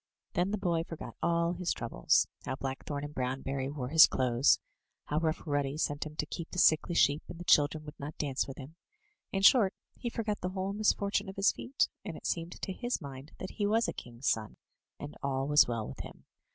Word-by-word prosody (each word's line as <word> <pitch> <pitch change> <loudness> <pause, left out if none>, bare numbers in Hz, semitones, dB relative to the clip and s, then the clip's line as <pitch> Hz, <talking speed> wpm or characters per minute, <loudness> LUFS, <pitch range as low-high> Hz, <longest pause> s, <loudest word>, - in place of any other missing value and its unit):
'* - - -51
Then 175 +3 +1
the 210 - -1
boy 170 -4 0
forgot 165 -1 -8
all 170 0 +2
his 180 0 -1
troubles 115 - +2
— - - -20
^how 130 - -2
Blackthorn 140 +2 -4
and 145 0 -6
Brownberry 135 +1 -2
wore 130 -4 -4
his 160 +2 +9
clothes, 125 -5 +3 0.5
how 150 - 0
Rough 160 0 -1
Ruddy 145 -1 -1
sent 145 -1 -1
him 150 - -11
to 150 - -1
keep 165 +2 -6
the - - -8
sickly 165 0 +4
sheep, 145 -1 +4
and - - -7
the - - -5
children 150 -1 +3
would 150 - -10
not 145 +2 -6
dance 140 -3 -1
with 135 - -8
him; 145 +4 -10 0.5
in 195 0 -1
short, 200 -3 +6 0.2
he 240 - -2
forgot 220 -3 -3
the 180 - -1
whole 190 +1 -3
misfortune 205 -1 +1
of 190 - -8
his 195 +2 +4
feet, 265 +3 0 0.2
and - - -6
it - - -13
seemed 170 0 -2
to 190 - -3
his 245 +4 -2
mind 140 -2 -9
that 185 - -6
he 205 -2 -1
was 225 +2 +2
a - - -2
king's 120 +2 -7
son, 110 -1 0 0.4
and 145 +1 -7
all 135 -1 -1
was 150 0 +6
well 115 -3 -2
with - - -9
him. - - -9
155 Hz, 225 wpm, -31 LUFS, 135-185 Hz, 0.5 s, his